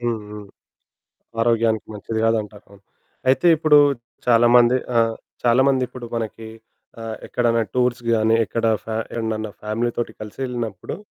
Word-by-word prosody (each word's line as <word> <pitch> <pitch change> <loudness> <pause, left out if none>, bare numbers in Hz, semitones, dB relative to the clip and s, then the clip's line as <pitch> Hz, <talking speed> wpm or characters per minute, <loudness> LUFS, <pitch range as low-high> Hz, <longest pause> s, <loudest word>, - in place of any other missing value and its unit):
హుహు. 105 -3 -4 1.0
ఆరోగ్యానికి 115 -1 +1
మంచిది 110 +2 -4
కాదంటారు. 105 -2 -1
అవును. 100 0 -18 0.5
అయితే 130 +6 +3
ఇప్పుడు 150 -1 +5 0.5
చాలా 120 -1 +5
మంది 120 +1 +5 0.2
ఆహ్, 115 -1 +3 0.3
చాలా 120 +2 +4
మందిప్పుడు 125 -2 -1
మనకి 110 0 -5 0.5
ఆహ్, 110 -1 -5
ఎక్కడన్నా 115 -1 +1
టూర్స్‌కి 125 -2 0
గాని 110 +1 +3
ఎక్కడ 115 +3 -2 0.2
ఫ్యా 110 -1 -4 0.2
ఏడన్నన 110 -2 -3
ఫ్యామిలీ 110 +3 -1
తోటి 120 - -2
కలిసెళ్ళినప్పుడు 115 -2 -5
115 Hz, 125 wpm, -21 LUFS, 110-120 Hz, 1.0 s, ఇప్పుడు